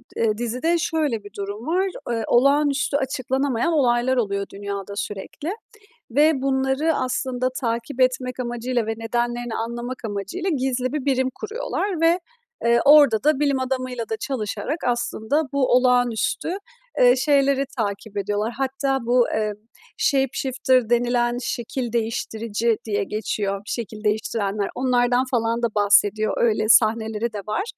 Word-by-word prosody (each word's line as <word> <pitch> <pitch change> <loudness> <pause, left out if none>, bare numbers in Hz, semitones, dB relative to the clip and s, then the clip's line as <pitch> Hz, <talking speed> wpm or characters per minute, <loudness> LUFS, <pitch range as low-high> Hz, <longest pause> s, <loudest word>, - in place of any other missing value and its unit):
eee, 215 -2 +1
dizide 250 +9 0
şöyle 300 -10 -1
bir 205 - -11
durum 205 +6 -5
var, 375 +3 +1 0.2
eee, 230 -2 -1
olağanüstü 280 +2 +3
açıklanamayan 265 +1 -1
olaylar 255 -2 +2
oluyor 200 -3 0
dünyada 200 0 -5
sürekli. 210 - -5 0.6
Ve 295 +1 +3
bunları 270 +3 +1
aslında 255 0 -1
takip 235 +3 -2
etmek 255 0 +1
amacıyla 240 -1 -2
ve 225 - -1
nedenlerini 240 +1 -2
anlamak 240 +2 -4
amacıyla 205 - -3
gizli 260 -3 -1
bir 290 -2 -3
birim 260 -1 +2
kuruyorlar 425 -5 -3
ve, 335 +2 +4 0.5
eee, 235 0 +4
orada 285 -6 +7
da 300 -2 +3
bilim 280 -2 +2
adamıyla 255 -3 -3
da 220 - -2
çalışarak 265 +6 -3
aslında 240 +3 0
bu 280 -2 +2
olağanüstü, 245 +1 +2 0.5
eee, 245 0 +6
şeyleri 275 0 +2
takip 205 -1 -3
ediyorlar. 205 +3 -1
Hatta 270 0 0
bu, 245 0 +4
eee, 215 -1 0 0.4
shapeshifter 260 -3 +1
denilen 240 0 +2
şekil 240 0 -3
değiştirici 225 0 -1
diye 205 -2 0
geçiyor, 200 -1 -2
şekil 215 -2 -5
değiştirenler 210 -1 -1
onlardan 250 0 +2
falan 230 -1 0
da - - +4
bahsediyor. 205 +1 +3
Öyle 215 -2 +1
sahneleri 220 0 +3
de 205 - -4
var. 215 - -1
245 Hz, 130 wpm, -23 LUFS, 220-270 Hz, 0.6 s, orada